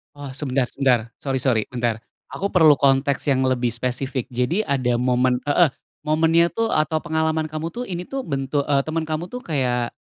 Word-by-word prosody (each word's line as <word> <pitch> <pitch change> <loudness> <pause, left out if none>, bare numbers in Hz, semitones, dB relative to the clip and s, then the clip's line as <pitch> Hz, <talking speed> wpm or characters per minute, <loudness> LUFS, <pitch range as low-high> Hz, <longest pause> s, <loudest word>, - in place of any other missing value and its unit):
Oh, 140 -2 -8
sebentar 135 -2 -1
sebentar, 125 -4 +1
sorry 135 -2 -2
sorry, 120 -4 +2
bentar. 120 -3 -2 0.3
Aku 200 - -2
perlu 160 -5 +6
konteks 135 0 +2
yang 130 -1 +2
lebih 125 -2 0
spesifik. 125 +2 -2
Jadi 125 - 0
ada 130 - 0
momen 125 0 +2
heeh, 155 +3 +4 0.3
momennya 165 +2 +3
tuh 225 0 -1
atau 155 +1 +1
pengalaman 160 -1 0
kamu 155 +1 -4
tuh, 245 - -4
ini 175 -1 -4
tuh, 270 -1 -4
bentu 140 - -1
eee, 140 -1 +2
temen 160 +1 -2
kamu 160 +3 -3
tuh 250 - -5
kayak 125 -6 -1
140 Hz, 180 wpm, -22 LUFS, 125-160 Hz, 0.3 s, perlu